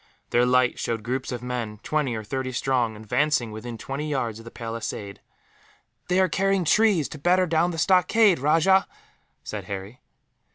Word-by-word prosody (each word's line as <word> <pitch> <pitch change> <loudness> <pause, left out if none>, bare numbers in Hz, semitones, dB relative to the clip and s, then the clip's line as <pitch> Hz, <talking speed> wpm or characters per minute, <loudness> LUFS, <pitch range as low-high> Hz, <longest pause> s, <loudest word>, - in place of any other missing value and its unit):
Their 120 +1 +3
light 125 0 +2
showed 115 -2 -2
groups 130 +3 -3
of 120 -1 -5
men, 120 -4 -4
twenty 150 -6 -1
or 110 - -5
thirty 130 +4 -3
strong, 125 -3 0
advancing 120 +3 0
within 115 +2 -7
twenty 140 +6 -5
yards 120 -6 -2
of 115 - -13
the - - -8
palisade. 115 -4 -6 0.9
"They 180 +1 +2
are 190 - +4
carrying 195 +1 +1
trees, 205 -5 +3
to 150 - -9
batter 180 +4 +3
down 165 +1 +2
the 170 - -5
stockade, 185 +2 +4
Rajah!" 165 +7 +3 0.6
said - - -6
Harry. 100 +4 -7
130 Hz, 165 wpm, -25 LUFS, 115-165 Hz, 0.9 s, are